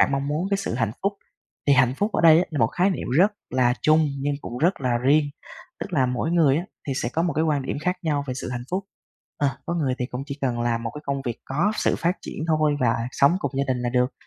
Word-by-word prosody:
bạn -, -, +4 dB
mong 140 Hz, +1 st, -1 dB
muốn 160 Hz, +6 st, -1 dB
cái 200 Hz, -, +3 dB
sự 195 Hz, -, -3 dB
hạnh 115 Hz, -3 st, 0 dB
phúc. 200 Hz, +1 st, +1 dB, 0.5 s
Thì 140 Hz, -, +5 dB
hạnh 125 Hz, 0 st, +4 dB
phúc 205 Hz, +1 st, 0 dB
ở -, -, +1 dB
đây 160 Hz, -1 st, +8 dB
á, 180 Hz, -, +2 dB
là 150 Hz, -, -3 dB
một 115 Hz, -, +4 dB
khái 180 Hz, -, +1 dB
niệm 185 Hz, -, -3 dB
rất 205 Hz, +3 st, +5 dB, 0.2 s
là 125 Hz, -1 st, +2 dB
chung 155 Hz, 0 st, +4 dB
nhưng 145 Hz, +1 st, 0 dB
cũng 120 Hz, -2 st, -6 dB
rất 175 Hz, 0 st, +1 dB
là 120 Hz, -2 st, +1 dB
riêng. 145 Hz, +4 st, +4 dB, 0.6 s
Tức 200 Hz, -, -6 dB
là 135 Hz, -6 st, +3 dB
mỗi 125 Hz, +6 st, -1 dB
người 155 Hz, -5 st, +4 dB
á, 170 Hz, -, 0 dB, 0.3 s
thì -, -, +1 dB
sẽ 120 Hz, -, 0 dB
có 165 Hz, -, +1 dB
một 170 Hz, -3 st, 0 dB
cái 160 Hz, +2 st, +1 dB
quan 145 Hz, -3 st, +1 dB
điểm -, -, -3 dB
khác 180 Hz, +1 st, 0 dB
nhau 145 Hz, -4 st, 0 dB
về 130 Hz, -, -3 dB
sự 125 Hz, -, -5 dB
hạnh 120 Hz, -1 st, -4 dB
phúc. 190 Hz, +2 st, -1 dB, 0.5 s
Ờ, 145 Hz, -, +2 dB, 0.2 s
có 170 Hz, -, -1 dB
người 140 Hz, -6 st, 0 dB
thì 125 Hz, -, -1 dB
cũng 125 Hz, +2 st, -5 dB
chỉ 140 Hz, 0 st, -6 dB
cần 120 Hz, -3 st, -1 dB
làm 115 Hz, -1 st, 0 dB
một 115 Hz, -, -3 dB
cái 150 Hz, -, -6 dB
công 140 Hz, -1 st, -2 dB
việc 120 Hz, -3 st, -4 dB
có 155 Hz, +11 st, 0 dB
sự -, -, +1 dB
phát 175 Hz, +2 st, 0 dB
triển 155 Hz, -, -5 dB
thôi 155 Hz, -2 st, +2 dB
và 120 Hz, -1 st, +2 dB, 0.2 s
sống 145 Hz, +6 st, +4 dB
cùng -, -, -2 dB
gia 140 Hz, -, +2 dB
đình -, -, -4 dB
là 120 Hz, -, 0 dB
được. 125 Hz, +1 st, +1 dB
140 Hz, 280 wpm, -24 LUFS, 125-165 Hz, 0.6 s, đây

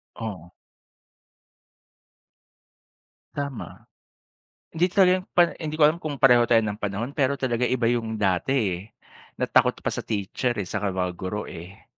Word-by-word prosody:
Oo. 95 Hz, -7 st, -7 dB, 2.8 s
Tama, 140 Hz, -4 st, -6 dB, 0.9 s
hindi 175 Hz, +3 st, +3 dB
talaga 185 Hz, -1 st, +4 dB
pa 175 Hz, -1 st, +5 dB
hindi 155 Hz, -1 st, -4 dB
ko 155 Hz, -, +2 dB
alam 160 Hz, +3 st, +1 dB
kung 145 Hz, -3 st, -4 dB
pareho 125 Hz, -3 st, +6 dB
tayo 115 Hz, -1 st, +5 dB
ng 105 Hz, 0 st, -4 dB
panahon 105 Hz, +5 st, -3 dB
pero 140 Hz, -1 st, +1 dB
talaga 125 Hz, -2 st, -1 dB
iba 125 Hz, -2 st, +1 dB
yung 115 Hz, -2 st, -1 dB
dati, 95 Hz, +5 st, +1 dB, 0.2 s
eh, 85 Hz, -, -6 dB, 0.6 s
na -, -, 0 dB
takot -, -, +3 dB
pa -, -, -3 dB
sa -, -, -3 dB
teacher, 110 Hz, +4 st, -2 dB
eh, 100 Hz, -, -2 dB
saka 100 Hz, +2 st, -2 dB
mga 90 Hz, -1 st, -2 dB
guro, 95 Hz, +3 st, -4 dB
eh. 90 Hz, +4 st, -11 dB
115 Hz, 145 wpm, -25 LUFS, 100-140 Hz, 2.8 s, pareho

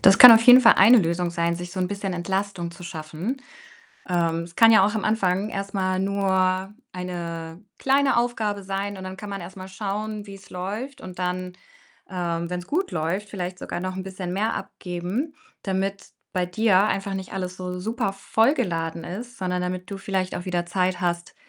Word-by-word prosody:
Das 195 Hz, +1 st, +7 dB
kann 250 Hz, -1 st, +13 dB
auf 225 Hz, 0 st, +7 dB
jeden 250 Hz, +2 st, +9 dB
Fall -, -, +7 dB
eine 230 Hz, +6 st, +8 dB
Lösung 170 Hz, -1 st, 0 dB
sein, 170 Hz, 0 st, 0 dB
sich 175 Hz, +1 st, -6 dB
so 185 Hz, -, -6 dB
'n 180 Hz, -, +1 dB
bisschen 200 Hz, -1 st, -3 dB
Entlastung 190 Hz, 0 st, -2 dB
zu 175 Hz, +2 st, -13 dB
schaffen. 170 Hz, -, -5 dB, 0.7 s
Ähm, 170 Hz, -2 st, +1 dB
es 170 Hz, 0 st, -14 dB
kann 225 Hz, 0 st, +7 dB
ja 220 Hz, -3 st, +7 dB
auch 210 Hz, -, -1 dB
am 215 Hz, -, -1 dB
Anfang 200 Hz, -2 st, +1 dB
erst 195 Hz, -1 st, -5 dB
mal 185 Hz, -1 st, 0 dB
nur 190 Hz, -1 st, +1 dB, 0.2 s
eine 170 Hz, -1 st, -6 dB, 0.2 s
kleine 270 Hz, 0 st, +3 dB
Aufgabe 225 Hz, -4 st, 0 dB
sein 195 Hz, +1 st, -3 dB
und 190 Hz, -, -8 dB
dann 185 Hz, 0 st, -6 dB
kann 210 Hz, 0 st, -8 dB
man 200 Hz, 0 st, -4 dB
erst 175 Hz, +3 st, -9 dB
mal 185 Hz, 0 st, -8 dB
schauen, 210 Hz, +2 st, -4 dB
wie's 195 Hz, 0 st, -12 dB
läuft 210 Hz, +10 st, -5 dB
und 185 Hz, -1 st, -9 dB
dann, 180 Hz, 0 st, -2 dB, 0.6 s
ähm, 170 Hz, -2 st, -2 dB
wenn's 180 Hz, 0 st, -4 dB
gut 365 Hz, -, -1 dB
läuft, 175 Hz, +6 st, -2 dB
vielleicht 180 Hz, -2 st, -5 dB
sogar -, -, -5 dB
noch 185 Hz, 0 st, -4 dB
'n 190 Hz, -, -3 dB
bisschen 185 Hz, -1 st, -5 dB
mehr 215 Hz, +4 st, 0 dB
abgeben, 185 Hz, -, -4 dB, 0.3 s
damit 195 Hz, 0 st, -2 dB, 0.2 s
bei 180 Hz, -1 st, +1 dB
dir 195 Hz, +1 st, +3 dB
einfach 195 Hz, -2 st, -1 dB
nicht 190 Hz, -1 st, -6 dB
alles 185 Hz, -1 st, -4 dB
so 180 Hz, 0 st, -5 dB
supervoll 220 Hz, +3 st, +1 dB
geladen 165 Hz, -, -2 dB
ist, 235 Hz, +7 st, -7 dB
sondern 180 Hz, -1 st, -1 dB
damit 180 Hz, +1 st, -4 dB
du 200 Hz, -, -4 dB
vielleicht 190 Hz, -1 st, -2 dB
auch 175 Hz, -, -6 dB
wieder 175 Hz, -2 st, -1 dB
Zeit 180 Hz, 0 st, 0 dB
hast, 175 Hz, -1 st, -2 dB
190 Hz, 195 wpm, -24 LUFS, 180-205 Hz, 0.7 s, kann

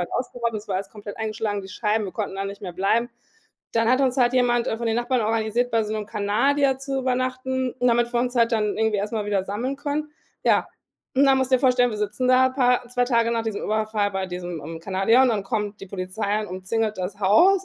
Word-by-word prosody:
halt 175 Hz, -, -4 dB
ausgeraubt, 245 Hz, -2 st, -2 dB
es 210 Hz, 0 st, -5 dB
war 190 Hz, -, 0 dB
alles 195 Hz, -, -4 dB
komplett 205 Hz, -1 st, -9 dB
eingeschlagen, 215 Hz, -2 st, -2 dB
die 190 Hz, -, -10 dB
Scheiben, 210 Hz, +2 st, 0 dB
wir 190 Hz, -, -6 dB
konnten -, -, -4 dB
da 195 Hz, -, -2 dB
nicht 200 Hz, +1 st, -7 dB
mehr 180 Hz, -3 st, -5 dB
bleiben. 210 Hz, +7 st, +1 dB, 0.6 s
Dann 230 Hz, 0 st, +2 dB
hat 255 Hz, +1 st, +3 dB
uns 260 Hz, -2 st, +2 dB
halt 245 Hz, -2 st, +3 dB
jemand, 240 Hz, -1 st, +2 dB
äh, -, -, -1 dB
von 235 Hz, -, -3 dB
den 225 Hz, 0 st, +1 dB
Nachbarn 245 Hz, +1 st, +1 dB
organisiert, 225 Hz, +2 st, 0 dB
bei 230 Hz, -1 st, +2 dB
so 210 Hz, -, -4 dB
'nem 215 Hz, -1 st, -3 dB
Kanadier 260 Hz, +7 st, +1 dB
zu 270 Hz, 0 st, -3 dB
übernachten, 255 Hz, 0 st, -1 dB
damit 240 Hz, -1 st, +2 dB
wir 240 Hz, -, +2 dB
uns 250 Hz, 0 st, -1 dB
halt 230 Hz, 0 st, +3 dB
dann 210 Hz, -2 st, +1 dB
irgendwie 220 Hz, -1 st, +2 dB
erst 205 Hz, +2 st, -3 dB
mal 215 Hz, -2 st, -2 dB
wieder 200 Hz, -2 st, 0 dB
sammeln 235 Hz, +8 st, -3 dB
können. 295 Hz, +2 st, -3 dB, 0.3 s
Ja, -, -, +3 dB, 0.5 s
und 270 Hz, +2 st, +5 dB
dann 270 Hz, -1 st, +5 dB
musst 260 Hz, 0 st, 0 dB
du -, -, +8 dB
dir -, -, -5 dB
vorstellen, 250 Hz, -2 st, +3 dB
wir 215 Hz, -, -5 dB
sitzen 210 Hz, +4 st, -1 dB
da 255 Hz, 0 st, +5 dB
paar 250 Hz, -2 st, +2 dB
2 245 Hz, 0 st, +1 dB
Tage 235 Hz, -2 st, +2 dB
nach 230 Hz, -1 st, 0 dB
diesem 220 Hz, -2 st, -3 dB
Überfall 215 Hz, -1 st, 0 dB
bei 190 Hz, 0 st, -2 dB
diesem, 180 Hz, -3 st, -6 dB
ähm, 165 Hz, +1 st, -7 dB
Kanadier 195 Hz, +7 st, +3 dB
und 260 Hz, -, +4 dB
dann 215 Hz, -4 st, 0 dB
kommt 210 Hz, -1 st, -3 dB
die 195 Hz, -, -8 dB
Polizei 200 Hz, +3 st, -2 dB
und -, -, -6 dB
umzingelt 210 Hz, +4 st, -2 dB
das 185 Hz, +2 st, -4 dB
Haus 360 Hz, -, +5 dB
225 Hz, 240 wpm, -24 LUFS, 205-250 Hz, 0.6 s, du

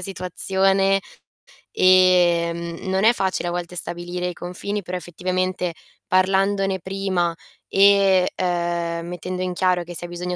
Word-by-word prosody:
situazione 195 Hz, +1 st, +1 dB, 0.7 s
ehm, 175 Hz, -2 st, +3 dB
non 190 Hz, +1 st, 0 dB
è 225 Hz, +2 st, +6 dB
facile 190 Hz, -5 st, -1 dB
a -, -, -3 dB
volte 175 Hz, 0 st, -5 dB
stabilire 175 Hz, +1 st, -3 dB
i -, -, -6 dB
confini, 185 Hz, +4 st, -5 dB
però 180 Hz, -1 st, -5 dB
effettivamente 180 Hz, 0 st, -3 dB, 0.3 s
parlandone 195 Hz, +1 st, +1 dB
prima, 185 Hz, -2 st, -2 dB, 0.3 s
e, 195 Hz, -2 st, +4 dB
uhm, 170 Hz, -1 st, -1 dB
mettendo 180 Hz, +1 st, -5 dB
in 180 Hz, -1 st, -2 dB
chiaro 180 Hz, -1 st, +1 dB
che 175 Hz, +1 st, -9 dB
si 175 Hz, -, -3 dB
ha -, -, -6 dB
bisogno 180 Hz, +1 st, -4 dB
180 Hz, 135 wpm, -22 LUFS, 175-190 Hz, 0.7 s, è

